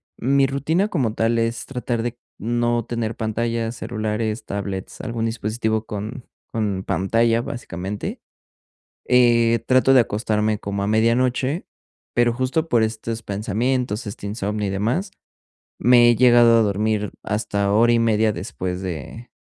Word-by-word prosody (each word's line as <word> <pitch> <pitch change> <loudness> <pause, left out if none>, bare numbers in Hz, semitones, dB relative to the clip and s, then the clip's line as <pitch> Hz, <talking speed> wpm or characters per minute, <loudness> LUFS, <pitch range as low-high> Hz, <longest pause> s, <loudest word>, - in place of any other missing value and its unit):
Mi 135 +2 +2
rutina, 160 +9 0
como 130 - -1
tal, 115 +1 +1
es 115 +1 -1
tratar 125 -3 -3
de 120 0 -4 0.2
no 120 +1 0
tener 115 -1 -3
pantallas, 115 +1 -2
celulares, 110 -1 -3
tablets, 100 -2 -5
algún 115 -1 -3
dispositivo 110 0 -2
con 110 +5 -6 0.3
con 105 -4 -1
pantalla, 115 +4 +2
básicamente. 105 - -5 0.9
Eh, 115 -2 +4
trato 130 +1 +4
de 130 - +8
acostarme 110 -1 0
como 100 -1 -3
a 100 - -1
medianoche, 125 - +1 0.5
pero 120 -1 +2
justo 130 +6 -1
por 115 -2 +3
estos 110 +1 -3
pensamientos, 110 +2 -1
este 100 0 -7
insomnio 105 0 -2
y - - -2
demás, 120 - -1 0.6
me 120 -1 +6
he 120 - +5
llegado 120 -1 +6
a - - +4
dormir 105 0 0
hasta 100 -1 -1
hora 115 +3 +4
y 120 - +3
media 110 -1 +2
después 90 -2 -4
de 95 - -6
115 Hz, 140 wpm, -22 LUFS, 105-120 Hz, 0.9 s, de